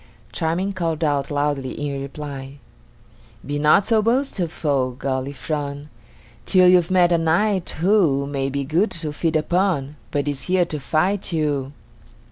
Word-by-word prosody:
Charming 175 +4 -1
called 165 -3 -2
out 145 -2 0
loudly 145 -2 -1
in 140 -2 -3
reply: 140 -1 -7 0.9
"Be 145 0 -3
not 150 +7 +4
so 225 -2 +3
boastful, 170 - 0
Galifron, 140 +2 -4 0.6
Till 185 -1 +5
you've 180 -1 +5
met 180 -2 +4
a 170 - +3
knight, 180 +4 +1
who 170 -8 +3
May 135 -1 -2
be 140 +1 -2
good 165 +10 +1
to 160 -3 -5
feed 160 +2 -1
upon, 155 -3 0
But 145 0 -2
is 145 -2 -3
here 180 -1 +2
to 155 -3 -4
fight 180 +8 0
you." 145 -4 -1
155 Hz, 140 wpm, -22 LUFS, 140-180 Hz, 0.9 s, Till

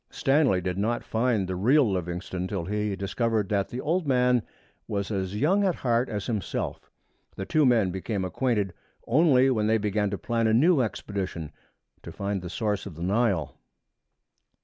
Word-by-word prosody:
Stanley 135 -9 +2
did 90 +1 -3
not 115 +4 0
find 110 -4 0
the 95 - -3
real 125 +8 +4
Livingstone 90 -1 -3
till 95 -4 -3
he 105 +1 -1
discovered 105 +2 -1
that 100 -2 0
the 125 - -5
old 165 +3 -1
man 125 -2 +3 0.5
was 100 +1 -3
as 95 -1 -2
young 190 +8 +3
at 185 -4 +1
heart 120 0 0
as 105 -2 -3
himself. 110 -7 -3 0.5
The 95 - -5
two 155 +3 +3
men 110 -7 +3
became 95 +1 -3
acquainted 105 -2 -1 0.3
only 135 -1 +4
when 110 -4 +1
they 110 +1 +3
began 105 -1 0
to 100 - -3
plan 115 0 0
a 110 - +3
new 155 +4 +4
expedition 95 -8 -4 0.5
to - - -9
find 100 -1 -3
the 90 - -7
source 105 +1 -2
of 90 - -9
the 85 - -6
Nile. 95 - 0
105 Hz, 170 wpm, -26 LUFS, 95-125 Hz, 0.5 s, real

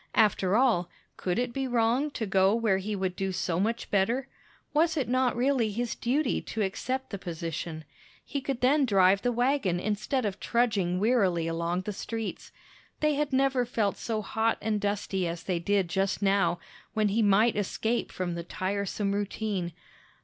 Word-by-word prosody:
After 205 -3 +3
all, 225 -8 +3 0.3
could 180 -1 -2
it 245 0 -1
be 270 0 -1
wrong 245 +4 +2
to 235 -6 -4
go 195 +1 +3
where 220 -5 +2
he 205 +2 -3
would 190 -2 -2
do 195 0 -2
so 180 -2 -1
much 225 +4 -1
better? 230 +7 +1 0.5
Was 325 +2 +2
it 270 - 0
not 255 0 +2
really 250 -3 +2
his 235 +3 -2
duty 275 +6 0
to 220 - -3
accept 260 +7 -3
the 200 - -4
position? 165 -2 -5 0.4
He 280 - -3
could 265 -2 -3
then 280 +4 +4
drive 195 -3 +4
the 245 - +1
wagon 245 -7 +1
instead 215 +6 -1
of 200 -2 -3
trudging 205 -7 +1
wearily 195 -7 +2
along 170 +2 -1
the 210 +2 -4
streets. 225 +2 -5 0.5
They 305 0 +2
had 295 0 -1
never 265 -1 +2
felt 220 -4 0
so 220 -2 -3
hot 225 +2 0
and 215 -2 -1
dusty 200 -2 -1
as 170 0 -5
they 180 -3 -1
did 195 +1 +1
just 195 +2 0
now, 195 -4 +2 0.4
when 215 -1 +2
he 220 +3 +1
might 215 +3 +4
escape 220 +3 -1
from 180 -2 -3
the 170 0 -4
tiresome 200 +3 -2
routine. 200 -3 -2
210 Hz, 175 wpm, -28 LUFS, 190-245 Hz, 0.5 s, then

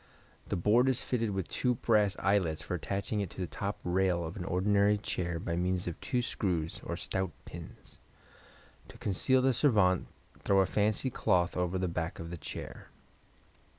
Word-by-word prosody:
The - - 0
board 110 +8 +4
is 130 - +1
fitted 115 -3 0
with 95 -3 -2
two 125 -1 0
brass 105 -4 +2
eyelets 90 -5 +1
for - - -4
attaching 100 +4 -2
it 100 - -3
to - - -13
the 90 - 0
top 100 +2 -4
rail 90 -1 +1
of 80 - -6
an 90 - -5
ordinary 100 +3 +3
chair 85 -4 -2
by 85 0 -2
means 90 +1 0
of 85 - -5
two 125 -2 0
screw 90 -8 0
eyes 80 - -8
or - - -4
stout 95 -1 -2 0.2
pins. 85 0 -11 0.9
To - - -13
conceal 130 +6 +2
the 135 0 +4
servante 100 - +3 0.3
throw 100 -1 +3
a - - +3
fancy 105 +6 +1
cloth 90 -5 +2
over 90 0 0
the 90 0 0
back 85 0 -3
of 85 0 -7
the 85 - -5
chair. 75 - -7
95 Hz, 185 wpm, -31 LUFS, 90-105 Hz, 0.9 s, board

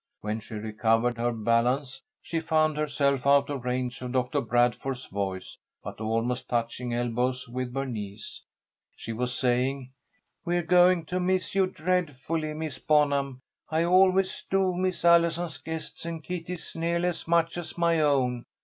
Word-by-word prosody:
When 105 +1 -2
she 110 +1 -9
recovered 115 +2 +1
her 120 +1 +1
balance 120 +4 0 0.2
she 165 - -2
found 155 -1 +2
herself 140 -3 0
out 140 0 +4
of 135 -4 -4
range 125 0 -2
of 125 0 -5
Doctor 130 +2 +1
Bradford's 120 +2 0
voice, 95 -2 -4 0.2
but - - -7
almost 115 +3 -1
touching 120 +1 -2
elbows 125 +2 -1
with 125 +1 -4
Bernice. 110 -6 -5 0.5
She 115 - -6
was 125 +2 -2
saying: 130 +1 0 0.5
"We're 175 0 0
going 180 0 +5
to 180 +3 -2
miss 185 0 0
you 190 -1 +3
dreadfully, 160 -3 -2
Miss 155 -3 -5
Bonham. 140 -3 +2 0.3
I 160 +1 +1
always 185 +1 +3
do 190 -1 +2
miss 185 -1 -1
Allison's 170 -1 +3
guests 160 -1 -6
and 165 -2 -5
Kitty's 180 0 -6
nearly 170 +2 0
as 175 - -6
much 170 0 +2
as 175 - -8
my 170 -1 +3
own. 130 -5 +1
140 Hz, 150 wpm, -27 LUFS, 120-170 Hz, 0.5 s, going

